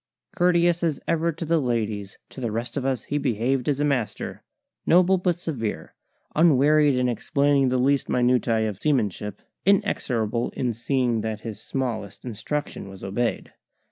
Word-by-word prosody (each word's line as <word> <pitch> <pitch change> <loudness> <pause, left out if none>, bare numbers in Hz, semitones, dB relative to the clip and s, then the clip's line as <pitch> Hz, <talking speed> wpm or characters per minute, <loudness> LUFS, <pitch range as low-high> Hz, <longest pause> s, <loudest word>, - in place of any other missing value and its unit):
Courteous 175 -1 +3
as 165 -4 0
ever 165 0 +1
to 165 +1 -6
the 165 +1 +2
ladies, 110 -5 -2
to 130 - -10
the 115 -3 -2
rest 115 +2 -4
of 135 - -2
us 130 -4 -1
he 145 - -2
behaved 130 0 0
as 140 -1 0
a 145 - +2
master, 130 -7 -2 0.4
noble 185 +2 +4
but 180 -1 +1
severe, 115 - -4 0.4
unwearied 150 -2 +5
in 125 0 +1
explaining 140 +2 +2
the 130 - +1
least 135 +2 +2
minutiae 120 -3 +2
of 100 -3 -6
seamanship, 105 -8 -1 0.2
inexorable 120 - +1
in 125 -2 -1
seeing 120 0 0
that 110 -1 -4
his 110 -2 -7
smallest 110 -7 -4
instruction 120 0 -4
was 95 -1 -11
obeyed. 115 +5 -2
125 Hz, 155 wpm, -24 LUFS, 115-150 Hz, 0.4 s, unwearied